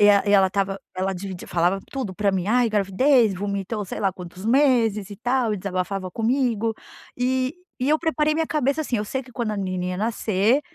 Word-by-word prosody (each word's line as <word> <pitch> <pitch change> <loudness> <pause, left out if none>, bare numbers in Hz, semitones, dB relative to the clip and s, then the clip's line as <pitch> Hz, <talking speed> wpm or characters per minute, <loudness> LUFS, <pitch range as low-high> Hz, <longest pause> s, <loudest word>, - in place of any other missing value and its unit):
E 205 - +7
a 200 -1 +6
e - - +2
ela 195 -2 +6
estava, 195 0 -1 0.2
ela 190 +1 -1
dividi 185 -1 -6
falava 175 +3 +1
tudo 255 -9 -4
pra 205 +1 +1
mim, 190 -2 -1
"Ai, 240 +2 +3
gravidez", 215 +2 +3
vomitou, 200 +2 -3
sei - - -6
lá 195 -2 +1
quantos 180 +1 -10
meses 230 -6 +3
e 205 - -8
tal, 245 +1 +1
e - - -3
desabafava 185 0 -3
comigo. 230 0 0 0.4
E 255 +2 0 0.3
e 255 - +1
eu 310 - +5
preparei 310 -2 +1
minha 320 0 0
cabeça 295 -1 0
assim: 265 -6 -1
eu 210 - -1
sei 265 +5 -3
que 255 0 -16
quando 230 -3 -2
a 210 - -3
menininha 185 -2 -2
nascer, 215 +3 +1
210 Hz, 205 wpm, -23 LUFS, 195-250 Hz, 0.4 s, E